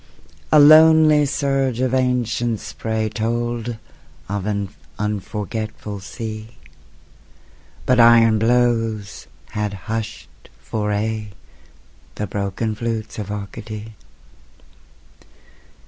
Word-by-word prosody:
A - - +6
lonely 155 0 +7
surge 135 -3 0
of 130 0 0
ancient 120 -3 0
spray 110 -1 -3
Told 120 +1 -2 0.5
of 100 0 -3
an 100 -2 -2 0.3
unforgetful 105 0 -4
sea, 110 +2 -7 1.3
But 125 -1 +3
iron 115 -2 +6
blows 115 -3 0 0.2
had 105 -1 -3
hushed 115 -1 -6
for 105 -1 -3
aye 105 0 -2 0.8
The 105 - -3
broken 100 +3 -2
flutes 110 0 -4
of 105 -2 -5
Arcady. 105 +2 -7
110 Hz, 85 wpm, -21 LUFS, 105-120 Hz, 1.3 s, lonely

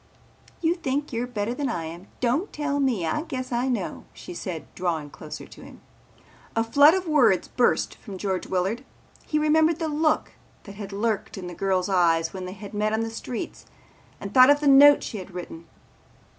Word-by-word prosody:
"You 330 0 +3
think 290 -4 -3
you're 235 +2 -2
better 230 -1 -2
than 275 +1 -2
I 165 - -3
am. 170 +4 -9
Don't 255 - 0
tell 295 -1 -2
me, 245 -11 +1
I 165 - -1
guess 260 -6 -5
I 245 +2 0
know," 250 -2 -3
she 355 - -9
said 180 - -5
drawing 165 -5 -2
closer - - -9
to - - -14
him. - - -13 0.8
A 225 - +2
flood 285 +8 +6
of 375 -2 -2
words 245 - +3
burst 245 - +1
from 200 -4 -10
George 190 -1 -2
Willard. 190 +7 -1 0.4
He 305 - 0
remembered 315 +1 +3
the 325 - -2
look 310 +1 +1 0.3
that 200 - -10
had 200 -1 -8
lurked 210 +1 -2
in 185 - -6
the 175 - -6
girl's 185 +1 0
eyes 165 -4 +2
when 185 -1 -6
they 185 - -6
had 200 +1 -10
met 210 +1 0
on 220 - +1
the 225 0 -3
streets 225 +1 -6 0.5
and 200 +1 -7
thought 255 +1 +8
of 290 0 +5
the 295 - 0
note 285 +1 +8
she 215 - -5
had 185 -1 -10
written. 170 -2 -8
230 Hz, 200 wpm, -25 LUFS, 190-285 Hz, 0.8 s, thought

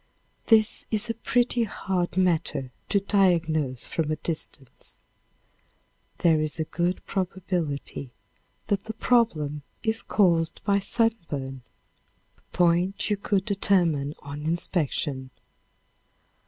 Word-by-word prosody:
This 220 -1 +4
is 220 +1 0
a - - -2
pretty 240 +1 +1
hard 185 -4 -2
matter 165 -7 +1 0.2
to 200 - +3
diagnose 165 - +2
from 160 -2 -1
a 155 - +1
distance. 155 -5 -5 1.2
There 160 -3 +4
is 155 +1 -2
a - - +2
good 175 +3 -2
probability 175 -8 -3 0.6
that 200 -1 -1
the 220 - -4
trouble 165 - +1 0.2
is 220 0 0
caused 170 -5 +2
by 200 -1 +3
sunburn, 170 - -1 0.7
a - - -31
point 180 +4 +2
you - - +4
could 195 -1 0
determine 175 -8 +2
on 145 +1 -6
inspection. 150 -4 -1
175 Hz, 110 wpm, -26 LUFS, 155-200 Hz, 1.2 s, This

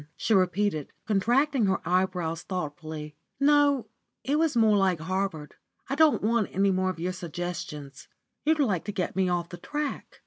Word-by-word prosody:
she 225 - +1
repeated, 185 -4 +1
contracting 240 +4 +2
her 190 - +1
eyebrows 180 -2 0
thoughtfully; 155 -3 -5 0.2
"no, 285 -3 +4 0.4
it 290 +3 +1
was 320 -6 +1
more 220 -2 +5
like 190 -4 +2
Harvard. 185 -3 -3 0.4
I - - -1
don't 305 -3 +4
want 225 -1 +2
any 195 +2 +2
more 185 0 +1
of 180 -3 -5
your 180 +2 -2
suggestions. 170 -5 -6 0.4
You'd 315 +1 +3
like 205 - +1
to 205 - -3
get 185 -3 -3
me 190 -1 +2
off 175 -1 -1
the 175 - -8
track." 295 +10 -5
190 Hz, 165 wpm, -27 LUFS, 175-235 Hz, 0.4 s, more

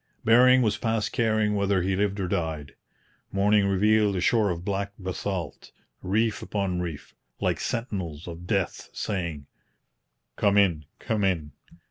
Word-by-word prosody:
Bering 125 +3 +6
was 105 -2 0
past 110 -1 -1
caring 110 -3 +1
whether 100 -2 +1
he 95 +1 0
lived 100 +1 0
or 95 - -1
died. 80 -5 -3 0.6
Morning 100 +1 +3
revealed 105 +1 +3
a - - 0
shore 105 +3 +2
of 85 0 -4
black 100 0 -2
basalt, 95 -1 -5 0.3
reef 110 +3 0
upon 95 -4 -2
reef, 85 -4 -6 0.3
like - - 0
sentinels 95 - -4
of 85 +1 -8
death 100 -4 -1
saying, 85 -7 -3 0.9
'Come 100 0 +3
in! 85 -7 +3
come 110 -2 -2
in! 85 -6 0
100 Hz, 140 wpm, -26 LUFS, 90-105 Hz, 0.9 s, Bering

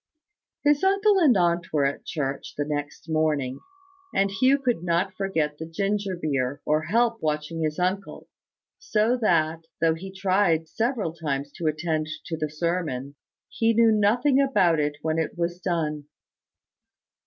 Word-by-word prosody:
His 295 +1 +3
uncle 395 +1 +4
and 280 - +5
aunt 170 -1 +1
were 145 -3 +2
at 140 - -2
church 135 -3 -4
the 145 - -1
next 145 +1 -4
morning; 150 -5 0 0.6
and 195 0 +2
Hugh 255 +8 +3
could 250 -10 -1
not 175 +2 0
forget 165 -7 -2
the 160 - -5
ginger 200 +3 -1
beer, 135 -4 -1
or 155 +1 +1
help 230 +4 +1
watching 155 +1 -2
his 155 -1 -1
uncle: 185 +2 -2 0.5
so 230 - +1
that, 165 -4 +1
though 165 -1 +3
he 190 +4 -8
tried 185 -4 +1
several 225 -3 -1
times 145 -4 -3
to 165 - -4
attend 155 0 -1 0.2
to 165 - -3
the 155 -1 -3
sermon; 150 -4 -2 0.3
he 225 0 +1
knew 230 0 +5
nothing 240 +7 +3
about 180 - +3
it 150 0 -1
when 160 0 0
it 160 +2 -3
was 175 +1 -2
done. 160 -5 -2
170 Hz, 155 wpm, -25 LUFS, 155-205 Hz, 0.6 s, and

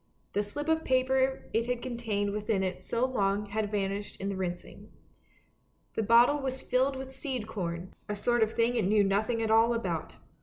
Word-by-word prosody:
The 205 - +2
slip 290 +9 -5
of 320 0 +2
paper 260 +1 +1
it 230 +1 +1
had 245 -1 -2
contained 225 -5 -2
within 210 -1 0
it 185 -1 -3
so 235 +2 0
long 205 -5 0
had 210 +1 -2
vanished 200 0 -2
in 195 - -2
the 200 - -2
rinsing. 180 -2 -5 1.0
The - - 0
bottle 235 +6 +5
was 265 -1 -2
filled 265 +2 +1
with 265 0 -7
seed 260 -5 -3
corn, 180 -4 -4 0.2
a 210 - -1
sort 240 +3 +1
of 220 0 +2
thing 235 +1 +2
it 230 - +1
knew 210 +1 +4
nothing 215 +4 +1
at 220 - 0
all 225 +2 +5
about. 180 -8 -3
225 Hz, 190 wpm, -30 LUFS, 200-255 Hz, 1.0 s, bottle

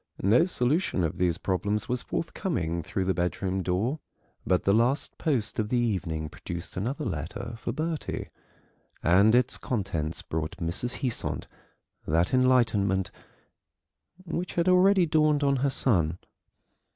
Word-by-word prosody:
No 110 - +5
solution 145 - 0
of 85 +2 -2
these 90 -2 +2
problems 100 +3 -1
was 125 -1 -1
forthcoming 85 - -2
through 95 +4 -3
the 95 - +2
bedroom 90 +2 -1
door, 100 - -1 0.5
but 90 - +2
the 100 - +3
last 120 +6 +1
post 130 -11 0
of 105 -1 -1
the 125 - +1
evening 95 -9 -1
produced 85 +3 -7
another 130 - -2
letter 115 - -4
for - - -3
Bertie, 160 0 -3 0.7
and 100 +7 +5
its 125 0 +2
contents 85 -9 -2
brought 80 0 -4
Mrs. 90 +11 -2
Heasant 125 -3 -2 0.6
that 85 +6 +1
enlightenment 110 -8 +3 1.1
which 170 +1 -4
had 170 +1 +1
already 185 0 +5
dawned 155 -2 +2
on 140 -1 +3
her 140 +2 +1
son. 90 -12 +1
110 Hz, 135 wpm, -27 LUFS, 90-140 Hz, 1.1 s, No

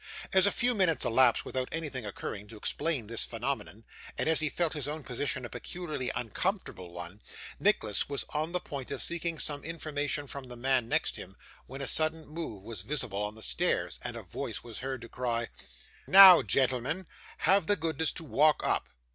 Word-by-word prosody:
As 190 +1 +6
a - - +3
few 245 +1 +3
minutes 180 - +2
elapsed 120 0 +4
without 130 -1 -3
anything 145 -8 -4
occurring 100 +1 -6
to 110 - -11
explain 145 +3 -1
this 115 +2 -1
phenomenon, 115 -2 -4 0.3
and - - 0
as 160 -1 +5
he 155 -1 +2
felt 170 +1 0
his 145 -3 -3
own 150 0 -4
position 130 +1 -2
a - - -4
peculiarly 155 -8 -4
uncomfortable 125 - -3
one, 90 +4 -8 0.4
Nicholas 110 - +2
was 140 -1 -1
on 155 +2 -2
the 180 - 0
point 140 -6 -7
of - - -3
seeking 170 -1 0
some 145 -1 0
information 145 -2 -2
from 140 -1 -7
the 125 - -9
man 125 -1 +1
next - - +1
him, - - -9 0.3
when 135 +2 -7
a - - -1
sudden 155 0 +1
move 150 - -6
was 110 -4 -6
visible 115 -6 -2
on 105 +1 -3
the 110 - -8
stairs, - - 0
and - - -5
a - - -7
voice - - -5
was 120 -2 -8
heard 130 -1 -4
to 115 - -9
cry, 120 -1 -2 0.6
'Now, 190 -2 +11
gentleman, 135 +7 +1 0.3
have 195 -3 +3
the 205 - +4
goodness 160 -3 0
to 165 - -5
walk 155 0 +3
up! - - 0
140 Hz, 190 wpm, -30 LUFS, 120-160 Hz, 0.6 s, Now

